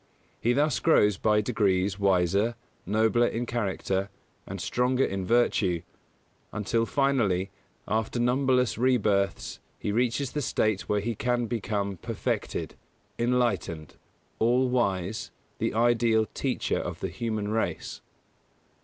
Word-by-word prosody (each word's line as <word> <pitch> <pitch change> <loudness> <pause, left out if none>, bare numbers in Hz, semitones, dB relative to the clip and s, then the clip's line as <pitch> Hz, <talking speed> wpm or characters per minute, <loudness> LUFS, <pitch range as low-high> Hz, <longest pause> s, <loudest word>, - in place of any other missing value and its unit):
He 120 - +2
thus 145 +1 +2
grows 105 - +4
by 105 -1 +3
degrees 100 -4 +1
wiser, 100 +4 +2 0.3
nobler 110 +4 +3
in 120 +2 -2
character, 100 -4 -2 0.4
and - - -6
stronger 125 +2 +1
in 95 -1 -3
virtue, 100 -7 +2 0.7
until, 115 +2 0
finally, 110 -10 +1 0.4
after 110 +3 -1
numberless 125 -3 +2
re 130 +1 +4
births 100 -4 0 0.2
he 105 - -3
reaches 125 +4 0
the 150 - -2
state 110 -6 0
when 105 -1 +1
he 115 +1 -1
can 120 +2 0
become 100 -4 -2
Perfected, - - -3 0.5
Enlightened, 115 - 0 0.5
All 125 +3 +3
wise, 100 -5 -1 0.3
the - - -1
ideal 115 -1 +3
Teacher - - -1
of - - -5
the - - -2
human 110 -3 -3
race. 110 +1 -2
110 Hz, 120 wpm, -27 LUFS, 100-120 Hz, 0.7 s, grows